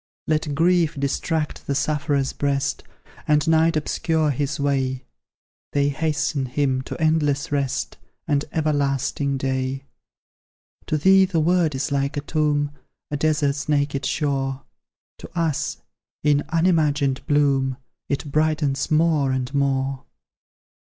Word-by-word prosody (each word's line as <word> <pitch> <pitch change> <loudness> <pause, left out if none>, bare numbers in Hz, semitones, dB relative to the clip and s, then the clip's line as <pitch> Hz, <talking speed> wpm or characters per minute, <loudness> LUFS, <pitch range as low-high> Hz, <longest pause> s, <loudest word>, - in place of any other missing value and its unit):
"Let 155 -2 0
grief 165 -2 +2
distract 150 +2 -2
the 140 - 0
sufferer's 145 -1 0
breast, 140 -1 -1 0.5
And 150 +1 +3
night 160 0 +4
obscure 155 0 0
his 140 +1 -2
way; 135 -2 0 0.7
They 145 0 +2
hasten 145 -2 -1
him 130 0 0
to - - -5
endless 150 -3 +1
rest, 130 - -2 0.3
And 145 -1 +1
everlasting 140 -2 0
day. 130 0 -2 1.0
"To 155 - +1
thee 190 +5 +6
the 180 -3 0
world 165 -2 +2
is 135 +3 -2
like 140 0 0
a - - 0
tomb, 145 -1 0 0.4
A - - 0
desert's 150 -1 0
naked 145 -1 0
shore; 135 -2 -1 0.6
To - - -10
us, 160 -4 -1 0.5
in 145 -1 +3
unimagined 155 -5 +2
bloom, 135 -3 +2 0.3
It 140 +1 -2
brightens 150 -2 +1
more 155 -3 +3
and 130 +1 -2
more! 135 -1 0
145 Hz, 120 wpm, -23 LUFS, 135-155 Hz, 1.0 s, thee